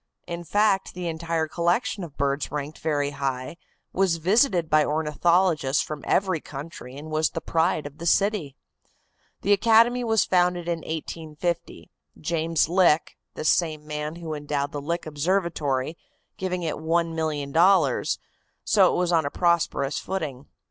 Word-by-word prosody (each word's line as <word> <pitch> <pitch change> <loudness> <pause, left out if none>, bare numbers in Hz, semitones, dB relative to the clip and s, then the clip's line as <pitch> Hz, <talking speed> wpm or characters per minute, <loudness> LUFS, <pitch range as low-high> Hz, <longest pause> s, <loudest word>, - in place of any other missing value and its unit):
In 170 0 -5
fact, 200 +2 +1
the 180 -1 -4
entire 165 0 -2
collection 175 +5 0
of 155 -5 -10
birds 140 +1 -1
ranked 150 +1 -5
very 145 -2 0
high, 135 +1 -3 0.4
was 190 -2 +2
visited 185 - +3
by 155 0 +4
ornithologists 155 0 +2
from 150 -2 -7
every 185 -4 +2
country, 135 -3 -9
and 155 +2 -9
was 155 0 +2
the - - -4
pride 165 -1 0
of 145 +1 -9
the 170 - -4
city. 195 -7 +1 0.9
The 205 - +4
academy 230 +4 +4
was 225 -2 +2
founded 180 -1 +1
in 170 -1 -1
1850, 160 +1 -5 0.3
James 165 -1 +1
Lick, 170 -3 +3 0.2
the - - -5
same 155 -2 +1
man 150 +1 -4
who 165 -2 -6
endowed 145 -1 -2
the 145 - -5
Lick 170 +4 -3
Observatory, 155 -3 -1 0.4
giving 180 -1 -3
it 160 - -2
$1,000,000, 160 +1 +2 0.5
so 195 -4 +4
it - - -1
was 180 -1 +1
on 160 -4 +2
a - - -1
prosperous 165 -4 +1
footing. 145 -8 -5
165 Hz, 145 wpm, -25 LUFS, 150-180 Hz, 0.9 s, by